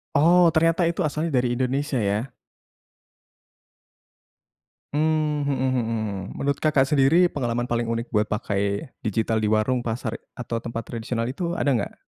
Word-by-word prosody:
Oh, 175 +5 +6
ternyata 165 +2 +3
itu 170 +2 0
asalnya 155 0 -1
dari 125 -1 +1
Indonesia, 135 +3 -1
ya? 105 +4 -1 2.6
Mmm, 155 0 +1
mhm 130 -1 0
mhm. 110 -5 -3
Menurut 140 0 -1
Kakak 150 -4 +3
sendiri 150 +5 +4
pengalaman 120 -7 -1
paling 120 -1 -1
unik 115 +2 -3
buat 105 0 +1
pakai 100 +4 -2
digital 110 -1 0
di 105 - +1
warung, 110 +4 +1
pasar, 115 -1 -4 0.2
atau 115 -2 -4
tempat 115 -1 -5
tradisional 115 0 -3
itu 145 +8 -3
ada 140 - +2
enggak? 115 -5 -2
125 Hz, 140 wpm, -24 LUFS, 115-150 Hz, 2.6 s, Oh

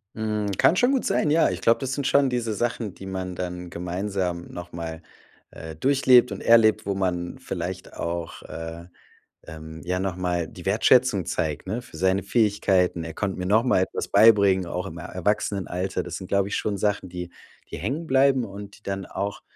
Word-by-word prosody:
Mhm, 105 -2 -1
kann - - +5
schon 245 +7 +3
gut 270 -2 0
sein, 150 - +1
ja. 160 -4 +4
Ich 90 0 -4
glaub, 115 - +4
das 135 -1 -3
sind 140 0 -1
schon 140 -1 +4
diese 120 -3 -1
Sachen, 115 -2 -2
die 95 - -10
man 95 -1 -4
dann 90 0 -5
gemeinsam 90 0 -3
noch 85 0 -8
mal, 80 -1 -6 0.5
äh, 80 -1 -9
durchlebt 130 - +4
und - - -5
erlebt, 115 -3 +5
wo 100 - -1
man 90 -2 -2
vielleicht - - -5
auch, 85 0 -4
äh 80 +1 -7 0.6
ähm, 80 0 -9
ja, 90 +1 -1
noch 95 -2 -2
mal 90 -2 -1
die 90 0 -10
Wertschätzung 110 -1 +4
zeigt, 80 -3 -2
ne, 110 +6 -3
für 80 - -13
seine 95 +2 +2
Fähigkeiten. 100 -6 +2
Er 80 -1 -7
konnt 100 -2 -2
mir 90 - -2
noch 110 +3 +4
mal 125 -6 +3
etwas 95 - -2
beibringen, 100 -4 +5
auch 90 +2 -3
im 85 -3 -7
E - - -7
Erwachsenenalter. 95 0 -2
Das - - -6
sind, 95 - -8
glaub 100 0 +2
ich, 100 - -3
schon 105 -2 -1
Sachen, 100 -2 -1
die 90 0 -6 0.4
die - - -5
hängenbleiben 135 -3 +2
und 100 0 -9
die - - -26
dann 95 -1 -4
auch 100 +2 -4
95 Hz, 195 wpm, -25 LUFS, 90-110 Hz, 0.6 s, kann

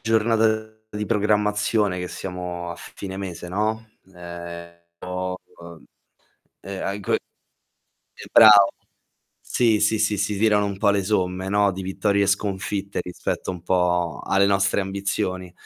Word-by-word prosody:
giornata 110 -1 +1 0.2
di 105 0 -4
programmazione 105 -2 +1
che 90 - -3
siamo 90 -2 -6
a 85 - -7
fine 95 -1 -8
mese, 90 -3 -6
no, 110 +4 -1 0.3
ehm 85 0 -8 0.3
ho 90 0 -4 0.2
uhm, 85 -1 -12 0.8
ehm, 95 -1 -6
anco 100 0 -3
e - - +3 1.1
brav 110 -1 +10 0.9
sì, 115 -4 +1
sì, 110 +1 +2
sì, 105 0 +1
si 100 0 -1
tirano 105 -1 +3
un 100 -1 -4
po' 100 - +3
le 100 -1 +1
somme, 95 -2 -1
no, 100 0 +3
di 95 +1 -6
vittorie 100 +2 0
e - - -1
sconfitte 100 -1 -1
rispetto 90 +1 -4
un 90 -2 -7
po' 90 -2 +1
alle 100 +1 +3
nostre 100 0 +2
ambizioni. 95 -2 -3
100 Hz, 140 wpm, -23 LUFS, 90-105 Hz, 1.1 s, brav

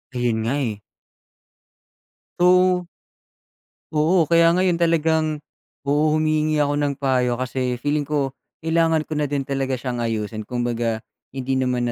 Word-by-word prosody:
Ayun 120 -2 0
nga, 120 +5 0
eh. 110 -7 -3 1.6
So 180 0 +4 1.0
Oo, 160 +3 +3
kaya 170 +1 +4
ngayon 180 -2 +2
talagang 160 -2 +1 0.4
oo, 150 +2 +2
humihingi 155 -1 +1
ako 145 0 0
ng 145 -1 0
payo 130 -3 +1
kasi 125 0 -2
feeling 145 +3 -1
ko 140 -2 0 0.3
kailangan 165 -1 +2
ko 155 -1 -4
na 150 - 0
din 140 -1 -1
talaga 135 -1 -2
siyang 125 -1 -4
ayusin. 110 -2 -3
Kumbaga, 120 -2 -2 0.3
hindi 130 0 -1
naman 125 -2 0
145 Hz, 130 wpm, -22 LUFS, 125-155 Hz, 1.6 s, So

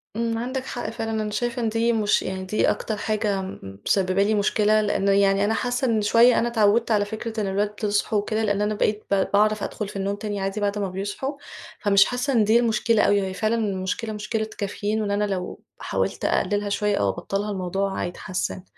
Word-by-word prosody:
امم، 230 0 -1
عندك 255 +2 -3
حق 240 -4 -4
فعلًا. 225 0 -4
أنا 215 -1 -1
شايفة 240 +3 -2
إن 225 - +1
دي 230 +1 +1
مش 215 -2 +2
يعني 190 0 -4
دي 215 +3 +1
أكتر 215 -2 -2
حاجة 210 -2 -1
م 95 - -8
مسبّبة 190 0 +2
لي 215 +2 +1
مشكلة، 210 +1 +3
لأنه 200 -1 +1
يعني 195 0 +3
أنا 220 - +1
حاسة 245 +2 -1
إن 225 -2 +2
شوية 230 +4 +5
أنا 235 - +1
اتعودت 225 0 +2
على 205 -1 +3
فكرة 220 +1 -5
إن 200 - -1
الولاد 205 +2 -1
يصحوا 205 +1 +1
وكده، 215 +2 -1
لأن 205 -1 +1
أنا 210 +1 +1
بقيت 210 +1 0
ب 195 -1 +3
باعرف 215 +1 +3
أدخل 210 - -4
في 205 - -10
النوم 195 +1 -1
تاني 205 -1 -4
عادي 195 +2 -2
بعد 205 0 0
ما 200 -2 -1
بيصحوا، 205 +9 -4 0.5
فمش 200 -1 +5
حاسة 250 +3 -1
إن 225 -3 +4
دي 220 +3 +4
المشكلة 230 -1 +2
أوي، 200 0 +3
وهي 190 -1 -3
فعلًا 215 +3 0
المشكلة 210 +1 -2
مشكلة 215 +1 -2
كافيين، 205 +2 -2
وإن 205 -1 -2
أنا 205 +1 +1
لو 185 -2 -4 0.2
حاولت - - -2
أقلّلها 205 0 0
شوية 210 0 +1
أو 100 - +1
أبطّلها 200 - -3
الموضوع 195 +1 -2
هيتحسن. 180 +1 -4
210 Hz, 210 wpm, -24 LUFS, 200-225 Hz, 0.5 s, شوية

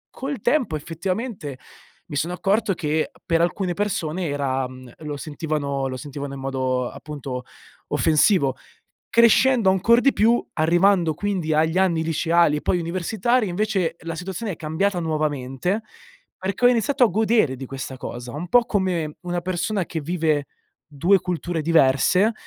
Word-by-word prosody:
col 270 -2 -4
tempo, 245 - +1
effettivamente, 175 - -4 0.5
mi 145 - -7
sono 165 +5 -1
accorto 205 +2 +1
che 155 - -1
per 165 -1 +2
alcune 180 +1 0
persone 180 -3 -2
era 135 -2 -1
mhmm, 130 -1 -12
lo 150 -2 -5
sentivano 145 -3 -3
lo 130 - -5
sentivano 140 +1 -6
in - - -8
modo, 130 -2 -1
appunto, 135 -4 -7 0.5
offensivo, 155 -3 +3 0.5
crescendo 235 -1 +5
ancor 225 +6 +4
di 275 - +4
più, 230 +3 +3
arrivando 170 +1 +3
quindi 180 -3 -1
agli 160 +3 +2
anni 170 -4 +2
liceali 165 -1 +2
e - - -5
poi 180 - +1
universitari, 200 +7 0
invece 185 -3 -1
la 165 0 -5
situazione 190 +5 -4
è - - -8
cambiata 175 +5 -1
nuovamente, 155 - -1 0.5
perché 195 +5 -1
ho - - +9
iniziato 250 +3 +3
a - - +4
godere 215 - +2
di 135 +1 -7
questa 130 0 -6
cosa, 120 -1 -7
un 170 +4 -5
po' 245 -1 +5
come 180 -8 -1
una 175 0 -2
persona 185 +2 -1
che 160 - -4
vive 155 -3 0 0.4
2 170 +6 +3
culture 175 -2 -2
diverse. 165 - +3
170 Hz, 150 wpm, -23 LUFS, 150-200 Hz, 0.5 s, ho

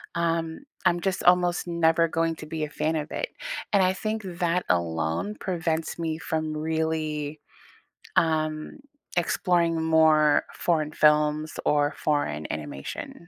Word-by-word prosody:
Um, 165 - -1 0.2
I'm 175 -1 +3
just 190 0 -1
almost 180 0 +3
never 165 -1 +3
going 165 0 0
to 155 - -8
be 160 0 -3
a 150 - -9
fan 160 +1 -1
of 150 0 -4
it, - - -2 0.4
and 200 - +5
I 185 - +3
think 215 +2 -3
that 180 -1 -1
alone 85 - 0
prevents 165 -3 -2
me 160 -1 -2
from 155 -1 -2
really, 155 -1 -2 0.8
um, 155 - 0 0.4
exploring 170 -1 +1
more 155 -2 +5
foreign 155 -3 0
films 150 0 +2
or 145 0 +2
foreign 75 - -1
animation. 75 - -6
160 Hz, 130 wpm, -26 LUFS, 150-170 Hz, 0.8 s, and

